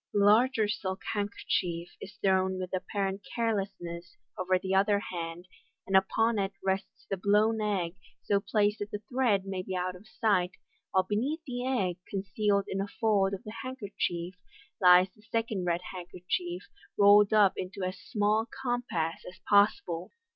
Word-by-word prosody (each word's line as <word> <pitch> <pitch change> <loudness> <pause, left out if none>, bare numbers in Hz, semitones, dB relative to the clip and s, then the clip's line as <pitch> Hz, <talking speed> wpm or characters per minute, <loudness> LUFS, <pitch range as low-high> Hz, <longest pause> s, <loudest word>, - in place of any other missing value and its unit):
The 200 -1 +3
larger 220 +1 +4
silk 190 -2 -3
handkerchief 180 -4 -2
is 195 - -9
thrown 190 -1 +2
with 185 0 -5
apparent 195 +1 -2
carelessness 195 -7 -3 0.2
over 185 0 +1
the 190 +1 -3
other 200 +1 +4
hand, 175 -2 -5 0.4
and 195 - -1
upon 225 +4 +3
it 195 0 -1
rests 190 0 -2
the 195 - -2
blown 210 +4 +3
eggt 190 -4 -1 0.2
so 200 - +2
placed 210 +1 +1
that 205 - -4
the 205 0 -6
thread 240 -7 +2
may 190 -1 -3
be 185 0 -5
out 180 0 -2
of 190 +4 -14
sight, 190 -5 +1 0.4
while 190 - +3
beneath 245 - -1
the 250 -2 -3
egg, 190 -10 0
concealed 200 +1 0
in 195 - -2
a 200 - -2
fold 200 -2 +1
of 195 - -12
the 215 -2 -8
handkerchief, 195 -8 -3 0.5
lies 180 +1 +7
the 210 - -21
second 225 -4 -2
red 175 0 0
handkerchief, 180 0 -4 0.3
rolled 205 0 +7
up 210 -3 +5
into 185 +1 -5
as 185 +1 -3
small 210 -1 +1
a - - -35
compass 245 -12 -2
as 185 - -14
possible. 195 -4 +3
195 Hz, 160 wpm, -29 LUFS, 185-210 Hz, 0.5 s, lies